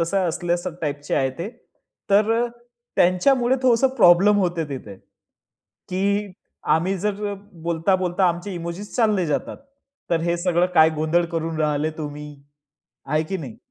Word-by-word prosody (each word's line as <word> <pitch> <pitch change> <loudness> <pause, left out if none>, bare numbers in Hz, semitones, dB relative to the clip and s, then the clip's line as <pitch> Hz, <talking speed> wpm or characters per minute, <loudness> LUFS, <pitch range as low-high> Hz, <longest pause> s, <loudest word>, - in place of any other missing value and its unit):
तसा 185 +3 +1
असल्यास 175 +1 -2 0.2
टाइपचे 145 -1 -2
आहे 135 -1 +1
ते. 180 +5 -3 0.6
तर 210 +2 +4
अ, 235 +1 +1 0.5
त्यांच्यामुळे 240 +8 +3
थोडसं 255 +1 +4
प्रॉब्लेम 195 +1 +6
होते 175 -3 0
तिथे, 120 -8 -7 0.9
की 200 +3 0 0.5
आम्ही 185 +4 0
जर 210 +1 -2
अ, - - -4 0.2
बोलता, 170 +2 0
बोलता 180 0 +1
आमचे 175 +3 -3
इमोजीस 170 +4 -6
चालले 215 -7 +2
जातात. 150 - -2 0.5
तर 165 -1 +2
हे 170 +1 0
सगळं 175 0 +2
काय 160 0 +6
गोंधळ 160 +3 +1
करून 165 -1 -2
राहिले 150 +1 0
तुम्ही? 150 -1 -6 0.8
आहे 155 +3 0
की 190 +4 -4
नाही? 130 -9 -8
175 Hz, 145 wpm, -22 LUFS, 160-200 Hz, 0.9 s, प्रॉब्लेम